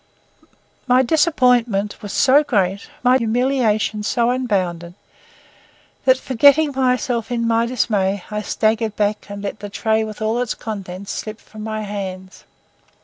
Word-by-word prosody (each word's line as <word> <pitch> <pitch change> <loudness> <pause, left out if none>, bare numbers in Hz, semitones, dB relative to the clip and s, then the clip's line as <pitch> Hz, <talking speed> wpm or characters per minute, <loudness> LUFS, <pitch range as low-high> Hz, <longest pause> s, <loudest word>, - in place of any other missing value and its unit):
My 255 +1 +4
disappointment 245 - +2
was 205 -2 -7
so 280 +7 +4
great, 200 -7 -1
my 250 +1 +4
humiliation 230 -3 0
so 235 +2 +1
unbounded, 185 -9 -2 1.1
that, 260 0 +5
forgetting 285 +4 +4
myself 250 -3 0
in 235 -1 0
my 230 0 +2
dismay, 205 -6 0
I 210 0 -2
staggered 220 +1 0
back 210 0 -1
and 200 0 -7
let 205 +1 -5
the 205 - -7
tray 220 +2 0
with 215 -1 -7
all 220 +2 0
its 245 - -2
contents 195 -3 -6
slip 215 0 -6
from 215 - -13
my 215 0 -3
hands. 190 -2 -7
220 Hz, 140 wpm, -20 LUFS, 205-250 Hz, 1.1 s, that